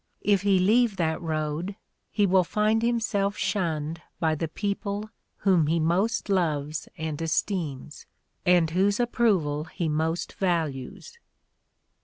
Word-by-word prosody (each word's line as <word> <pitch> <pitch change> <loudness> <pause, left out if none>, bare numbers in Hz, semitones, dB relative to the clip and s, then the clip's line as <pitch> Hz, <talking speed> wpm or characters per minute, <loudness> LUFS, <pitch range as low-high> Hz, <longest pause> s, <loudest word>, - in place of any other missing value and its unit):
If 200 -2 +3
he 200 -1 +3
leave 215 +4 +3
that 160 -1 0
road 160 +3 -2 0.3
he 205 - +2
will 185 -1 +4
find 215 +4 +1
himself 220 -4 0
shunned 165 -5 -1 0.2
by 160 -1 +2
the 160 +1 -2
people 205 +4 -3 0.3
whom 180 -6 +3
he 165 +2 +2
most 185 +8 +1
loves 155 -6 -1
and 160 -1 -4
esteems, 160 -4 -2 0.4
and 175 -3 +4
whose 200 +5 +2
approval 195 -12 +1
he 170 0 -3
most 160 +2 -1
values." 170 - -3
175 Hz, 125 wpm, -26 LUFS, 160-205 Hz, 0.4 s, will